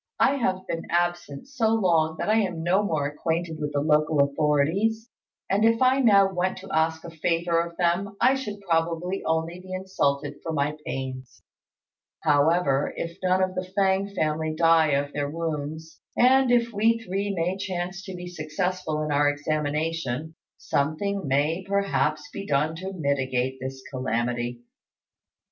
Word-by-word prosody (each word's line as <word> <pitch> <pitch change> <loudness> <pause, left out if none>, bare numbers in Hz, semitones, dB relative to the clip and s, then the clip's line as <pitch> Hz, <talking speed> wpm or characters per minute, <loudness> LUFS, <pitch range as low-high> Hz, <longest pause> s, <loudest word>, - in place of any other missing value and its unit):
I 280 - +4
have 185 -7 -1
been 165 - -4
absent 175 - -1
so 230 -5 +1
long 165 -6 +2
that - - -3
I 215 +1 +3
am 180 -6 -2
no 185 +4 +3
more 160 -8 -1
acquainted 160 +2 -2
with 150 -1 -2
the 145 - 0
local 150 0 +2
authorities; 155 +11 +1 0.4
and 200 +2 +1
if 230 0 +4
I 260 +1 +4
now 200 -6 +5
went 185 +1 -1
to 195 +1 -10
ask 160 0 +1
a 170 - -8
favour 165 +1 0
of 170 0 -6
them, 185 +3 0
I 260 - +5
should 210 -7 -5
probably 170 +1 -1
only 160 +2 -1
be 185 0 -12
insulted 145 -7 -1
for 165 - -4
my 145 0 0
pains. 130 -1 -6 0.8
However, 145 -1 +3
if 170 0 -5
none 185 0 +2
of 185 0 -1
the 185 0 -5
Fêng 195 0 +2
family 155 -1 -1
die 165 -2 +4
of 140 +1 0
their 145 -1 -2
wounds, 160 0 -5 0.2
and 260 +1 +5
if 235 -1 +2
we 225 +3 +3
three 200 -2 -3
may 175 +2 0
chance 190 -1 -4
to 190 - -7
be 180 0 -7
successful 160 -1 -2
in 155 - -2
our 145 0 +3
examination, 155 0 -2 0.2
something 165 +6 -1
may 150 +7 +1
perhaps 180 -6 0
be 200 - -6
done 150 +3 +1
to 190 +3 -5
mitigate 130 -5 -1
this 130 0 -6
calamity." 120 -1 -2
165 Hz, 160 wpm, -25 LUFS, 150-190 Hz, 0.8 s, now